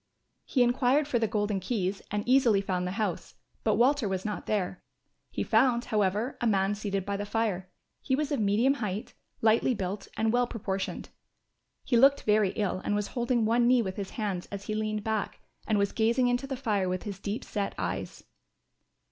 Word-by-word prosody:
He 255 Hz, -, +3 dB
enquired 255 Hz, +4 st, +2 dB
for 250 Hz, -5 st, +1 dB
the 225 Hz, -, +1 dB
Golden 205 Hz, -2 st, -1 dB
Keys 195 Hz, -1 st, -2 dB
and 210 Hz, +2 st, -3 dB
easily 250 Hz, -5 st, +5 dB
found 185 Hz, -2 st, -1 dB
the 180 Hz, -, -3 dB
house, 205 Hz, -6 st, -3 dB, 0.3 s
but 215 Hz, -2 st, +2 dB
Walter 245 Hz, -1 st, +3 dB
was 190 Hz, 0 st, -3 dB
not 210 Hz, -1 st, -4 dB
there. 190 Hz, -4 st, -1 dB, 0.5 s
He -, -, -2 dB
found, 245 Hz, -2 st, +3 dB
however, 210 Hz, +3 st, 0 dB
a 240 Hz, -, +2 dB
man 195 Hz, -1 st, +2 dB
seated 200 Hz, -2 st, -3 dB
by 200 Hz, 0 st, -2 dB
the 205 Hz, -, -3 dB
fire; 205 Hz, -5 st, -1 dB, 0.3 s
he 265 Hz, -, +1 dB
was 300 Hz, +1 st, -2 dB
of 285 Hz, -, 0 dB
medium 215 Hz, +6 st, +3 dB
height, 210 Hz, -6 st, -4 dB, 0.3 s
lightly 225 Hz, +3 st, +3 dB
built 195 Hz, 0 st, -4 dB
and 220 Hz, 0 st, +1 dB
well 245 Hz, 0 st, +3 dB
proportioned. 195 Hz, -4 st, -4 dB, 0.7 s
He 240 Hz, -, +2 dB
looked 275 Hz, +3 st, +5 dB
very 210 Hz, -2 st, +3 dB
ill 200 Hz, -4 st, -1 dB
and 205 Hz, -, 0 dB
was 205 Hz, -1 st, -1 dB
holding 240 Hz, -2 st, 0 dB
one 235 Hz, +2 st, +3 dB
knee 250 Hz, -1 st, +4 dB
with 190 Hz, -2 st, -5 dB
his 200 Hz, -2 st, -4 dB
hands 200 Hz, -5 st, -2 dB
as 200 Hz, -1 st, -7 dB
he 215 Hz, -, -3 dB
leaned 215 Hz, -1 st, -2 dB
back, 220 Hz, -1 st, -2 dB, 0.3 s
and 215 Hz, -, +2 dB
was 200 Hz, 0 st, +1 dB
gazing 235 Hz, +3 st, +2 dB
into 245 Hz, +3 st, 0 dB
the 270 Hz, -1 st, -4 dB
fire 210 Hz, -7 st, 0 dB
with 185 Hz, 0 st, -2 dB
his 200 Hz, -2 st, -6 dB
deep 205 Hz, +3 st, -4 dB
set 200 Hz, -2 st, -3 dB
eyes. 95 Hz, +1 st, -4 dB
215 Hz, 195 wpm, -29 LUFS, 195-240 Hz, 0.7 s, easily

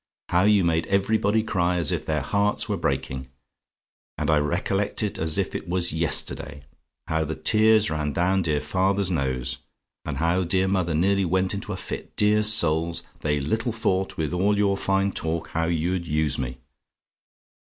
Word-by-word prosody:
How 90 Hz, +2 st, +3 dB
you 105 Hz, -2 st, +4 dB
made 85 Hz, -1 st, +1 dB
everybody 105 Hz, +2 st, +2 dB
cry 90 Hz, -4 st, 0 dB
as 85 Hz, -4 st, +1 dB
if -, -, -3 dB
their 75 Hz, -2 st, 0 dB
hearts 100 Hz, +5 st, 0 dB
were -, -, -1 dB
breaking; 65 Hz, 0 st, -3 dB, 0.9 s
and 75 Hz, 0 st, 0 dB
I 75 Hz, -, +4 dB
recollect 95 Hz, +8 st, -1 dB
it 105 Hz, -, -3 dB
as 80 Hz, -1 st, 0 dB
if -, -, -1 dB
it -, -, -5 dB
was 90 Hz, -2 st, +1 dB
yesterday, 75 Hz, -3 st, -1 dB, 0.4 s
how 80 Hz, 0 st, 0 dB
the 80 Hz, +1 st, -4 dB
tears 110 Hz, 0 st, +3 dB
ran 75 Hz, -1 st, -1 dB
down 90 Hz, +5 st, +1 dB
dear 75 Hz, -4 st, 0 dB
father's 95 Hz, +4 st, 0 dB
nose, 65 Hz, -5 st, -2 dB, 0.4 s
and 75 Hz, -3 st, -4 dB
how 85 Hz, +4 st, +1 dB
dear 95 Hz, +2 st, +1 dB
mother 90 Hz, -4 st, 0 dB
nearly 100 Hz, +4 st, +2 dB
went 95 Hz, +2 st, +1 dB
into 100 Hz, -, -5 dB
a -, -, -3 dB
fit! -, -, -7 dB
Dear 105 Hz, +1 st, +3 dB
souls! 85 Hz, -6 st, +1 dB, 0.2 s
They 75 Hz, -1 st, 0 dB
little 110 Hz, -, -1 dB
thought, 95 Hz, -4 st, -1 dB
with 80 Hz, 0 st, -2 dB
all 100 Hz, +3 st, +2 dB
your 100 Hz, -1 st, +2 dB
fine 95 Hz, 0 st, +1 dB
talk, 80 Hz, -1 st, -3 dB
how 80 Hz, 0 st, -1 dB
you'd 85 Hz, +1 st, -1 dB
use 75 Hz, -2 st, +1 dB
me. 65 Hz, 0 st, -4 dB
85 Hz, 170 wpm, -24 LUFS, 80-100 Hz, 0.9 s, you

